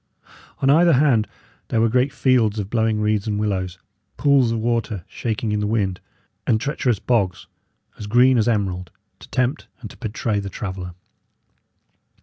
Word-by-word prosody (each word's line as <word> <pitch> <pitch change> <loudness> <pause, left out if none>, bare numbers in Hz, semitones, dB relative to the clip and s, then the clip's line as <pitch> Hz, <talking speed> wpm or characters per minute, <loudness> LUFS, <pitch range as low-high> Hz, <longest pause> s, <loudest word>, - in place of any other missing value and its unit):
On 135 - +4
either 170 +3 +5
hand 125 -6 +3 0.4
there 115 - 0
were 115 - +4
great 125 +4 +2
fields 120 -6 +2
of 100 -1 -4
blowing 110 -2 +1
reeds 105 0 0
and 105 -1 -1
willows, 95 -4 -2 0.4
pools 140 -5 +3
of 115 - -1
water 110 -5 -2
shaking 110 -1 -3
in 105 - 0
the 105 - -1
wind, 100 -4 0 0.5
and 110 - +3
treacherous 125 -3 0
bogs, 95 -6 0 0.5
as 105 - -6
green 125 +3 +5
as 110 - +1
emerald, 95 -6 -1 0.3
to - - -14
tempt 130 +4 -1
and 110 -5 -9
to - - -15
betray 110 -2 -2
the 100 -1 -5
traveller. 95 -3 -6
110 Hz, 160 wpm, -22 LUFS, 105-125 Hz, 0.5 s, either